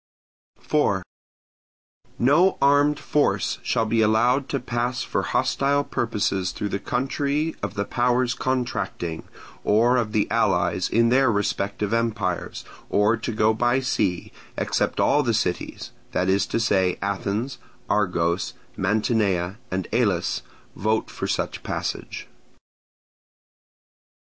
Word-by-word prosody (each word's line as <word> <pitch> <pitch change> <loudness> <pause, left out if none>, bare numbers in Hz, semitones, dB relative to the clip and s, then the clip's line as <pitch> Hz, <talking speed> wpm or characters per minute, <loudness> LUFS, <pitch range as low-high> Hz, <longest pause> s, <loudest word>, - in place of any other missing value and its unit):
4. - - +1 1.1
No 150 +10 +4
armed 145 +1 +4
force 100 -10 0
shall 115 - 0
be 115 +1 +1
allowed 120 +5 +2
to 140 - -1
pass 120 0 -2
for - - -1
hostile 140 +1 +1
purposes 100 -7 -1
through 105 - -4
the 100 - -2
country 140 +6 -1
of - - -4
the 100 - -1
powers 125 +2 +1
contracting, 120 -11 -3 0.4
or 120 +4 +4
of 115 -3 0
the 105 -2 +1
allies 90 -5 +1
in 115 +1 +3
their 130 0 +4
respective 100 0 -1
empires, 110 -6 -1 0.2
or 105 +3 +3
to 115 - -4
go 110 0 +2
by 120 +3 +2
sea, 105 -8 -1 0.3
except - - 0
all 145 +2 +4
the 120 -5 +1
cities—that 90 -1 -3
is 95 +1 +2
to - - -1
say, 95 -5 +2
Athens, 100 +6 -2 0.3
Argos, 90 -4 0 0.2
Mantinea, 100 -2 0
and 95 -1 -2
Elis—vote 110 +2 -1
for - - -4
such - - -2
passage. - - -4
110 Hz, 115 wpm, -24 LUFS, 100-125 Hz, 1.1 s, No